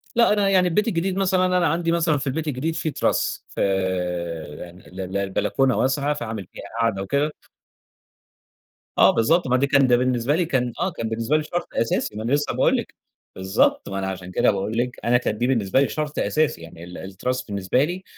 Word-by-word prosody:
لأ 235 -3 +5
أنا 205 -2 +2
يعني 185 -2 +4
البيت 210 +6 +1
الجديد 185 0 -1
مثلًا 185 -1 +2
أنا 180 -2 +2
عندي 170 +1 0
مثلًا 160 -3 +2
في 135 - -5
البيت 155 +3 -2
الجديد 150 +4 -2
فيه 155 - -2
تِراس، - - 0
فـي - - -7 1.0
يعني 90 +1 -11
ال 95 +1 -9
ال 95 +1 -4
البلكونة 110 +7 +1
واسعة 140 +3 +1
فعامل 110 -8 -5
فيها - - -9 0.2
قعدة 110 -4 +1
وكده 140 +9 0 1.7
آه - - +7
بالضبط 160 +9 +2
ما 130 - +3
ده 140 +2 +2
كان 140 -1 +4
ده 120 -1 +5
بالنسبة 125 +2 +1
لي 175 - +1
كان 125 -6 0
آه - - +1
كان 115 - -4
بالنسبة 115 +7 0
لي 155 - 0
شرط 175 +3 -4
أساسي 115 -2 -1
ما 110 - -4
أنا 120 +4 -1
لسه 145 0 +1
باقول - - +3
لِك، - - -5 0.4
بالضبط 95 0 +1
ما 95 - -4
أنا 95 - -2
عشان 90 -1 -5
كده - - +3
باقول 100 +3 -2
لِك 125 0 -1
أنا 120 +1 +4
كان 110 -3 -2
دي 120 - +1
بالنسبة 120 -1 +2
لي 140 - +2
شرط 150 -1 -4
أساسي 155 - +1
يعني، 80 +1 -11
ال 90 0 -9
التِراس 110 +7 -3
بالنسبة 100 +6 0
لي، 180 +4 -4
130 Hz, 210 wpm, -23 LUFS, 105-155 Hz, 1.7 s, آه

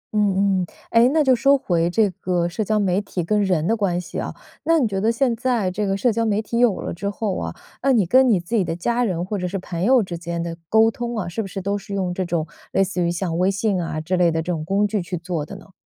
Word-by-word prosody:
嗯， 195 -2 +2
嗯， 180 - -1 0.3
哎， 235 +2 +5
那 310 +1 +3
就 260 -2 +4
说 275 +3 +4
回 170 -9 0
这 205 +2 +2
个 175 -2 0
社 180 +6 -2
交 215 +1 0
媒 195 -2 +1
体 190 -3 -4
跟 210 +4 +1
人 180 -5 +1
的 225 - +2
关 195 -5 0
系 180 - -6
啊， - - -3 0.3
那 330 0 +3
你 250 - +2
觉 195 -2 -2
得 220 +2 +3
现 235 0 +1
在 235 -5 0
这 200 +2 -2
个 195 - 0
社 240 +4 +2
交 230 +1 0
媒 215 -2 +1
体 230 +2 -2
有 240 -5 +3
了 - - -4
之 200 +4 -3
后 205 -2 -2
啊， - - -4 0.3
那 275 - +3
你 210 -6 +3
跟 255 +7 +5
你 200 - +4
自 175 +7 -4
己 205 - +3
的 165 -1 -3
家 235 +8 0
人 180 -6 -1
或 205 +1 -3
者 180 - -2
是 195 +2 -3
朋 180 -2 -4
友 250 +2 +5
之 185 -3 -6
间 170 0 -4
的 165 -1 -4
沟 220 +1 +5
通 240 0 -4
啊， 185 - -2
是 175 +6 -3
不 205 - -5
是 195 0 -5
都 200 +1 -1
是 200 0 -7
用 185 -2 -1
这 185 +1 -2
种 170 -2 -1 0.3
类 195 - +4
似 185 -1 -2
于 170 - +1
像 175 -1 -2
微 185 +2 +3
信 195 -2 0
啊， 155 -1 -3
之 170 +4 -1
类 180 -2 +4
的 160 0 -1
这 180 - -2
种 155 -2 -3
工 195 +5 +1
具 210 -1 -1
去 175 0 -4
做 170 -3 -3
的 200 - -8
呢？ 195 0 -14
195 Hz, 310 characters per minute, -22 LUFS, 175-220 Hz, 0.3 s, 哎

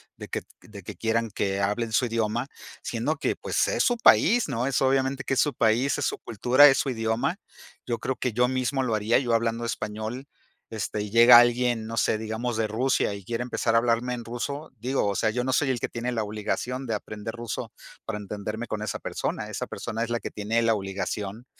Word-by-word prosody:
de - - -9
que - - -3 0.2
de 100 -3 -12
que - - -8
quieran 115 -1 -1
que 100 0 -1
hablen 105 +3 -1
su 120 +3 +2
idioma, 115 +1 -1 0.4
siendo - - -1
que, - - -1
pues, - - 0
es - - 0
su 245 - +2
país, 235 0 +5
¿no?, 125 -2 -1
es, 135 - +1
obviamente, 135 0 +1
que - - -1
es - - +1
su 145 - +2
país, 115 +5 +2
es 145 - -1
su - - -2
cultura, 125 +6 +5
es 135 - +4
su 135 - 0
idioma. 120 - -1 0.5
Yo 120 - -1
creo 130 +3 -2
que 125 - -2
yo 125 +3 +2
mismo 130 +1 0
lo 115 -3 -1
haría, 110 +2 +2
yo 120 -3 0
hablando 115 +1 0
español, 110 +4 -4 0.4
este, 105 -1 -3
y 105 - -5
llega 120 +1 +9
alguien, 120 -2 +2
no 115 - -5
sé, 110 - +2
digamos, 110 +2 -3
de 110 -1 +1
Rusia, 115 0 +1
y 100 -1 -8
quiere 115 +4 -3
empezar 120 -2 0
a - - +7
hablarme 120 +1 +1
en 120 -2 -6
ruso, 140 +6 -5
digo, 125 -1 0
o 100 - -1
sea, 110 - +1
yo 125 +3 -1
no 130 - 0
soy 145 - +2
el 125 -3 0
que - - -2
tiene 120 +1 -4
la 110 -3 -1
obligación 115 +5 -3
de 115 - -2
aprender 105 +1 -5
ruso 120 -4 -5 0.3
para 110 -2 -4
entenderme 105 +3 -5
con 105 -1 -4
esa 110 - -3
persona, - - -3
esa - - -4
persona 115 +1 -4
es 115 - -4
la 120 - -1
que - - -5
tiene 110 +3 -1
la 115 -1 +3
obligación 100 +3 -4
115 Hz, 225 wpm, -26 LUFS, 110-125 Hz, 0.5 s, llega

